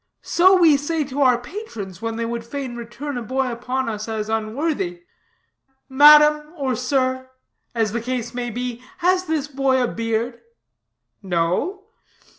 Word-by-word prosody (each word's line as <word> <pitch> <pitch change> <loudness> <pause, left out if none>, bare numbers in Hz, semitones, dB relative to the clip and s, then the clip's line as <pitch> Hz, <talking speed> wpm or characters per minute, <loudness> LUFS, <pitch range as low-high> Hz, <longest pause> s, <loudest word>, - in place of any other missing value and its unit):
So 375 +2 +5
we 320 -5 +6
say 305 +2 -1
to 280 +1 -4
our 255 -3 +5
patrons 235 - -8
when 225 0 -3
they 230 0 -2
would 235 0 -4
fain 255 +1 -5
return 245 +3 -6
a - - -6
boy 260 +2 -1
upon 250 +2 -3
us 215 -1 -4
as 220 -1 -3
unworthy: 310 - -2 0.9
'Madam, 300 +2 +6
or 265 -3 -1
sir, 260 +1 -1 0.5
(as 225 -3 +1
the 235 +1 -2
case 245 0 -3
may 245 0 -3
be) 245 +1 -4 0.2
has 365 +1 +2
this 310 -4 -1
boy 270 -2 +1
a - - +1
beard?' 230 +1 -2 0.8
'No.' 185 - -1
255 Hz, 150 wpm, -22 LUFS, 230-295 Hz, 0.9 s, we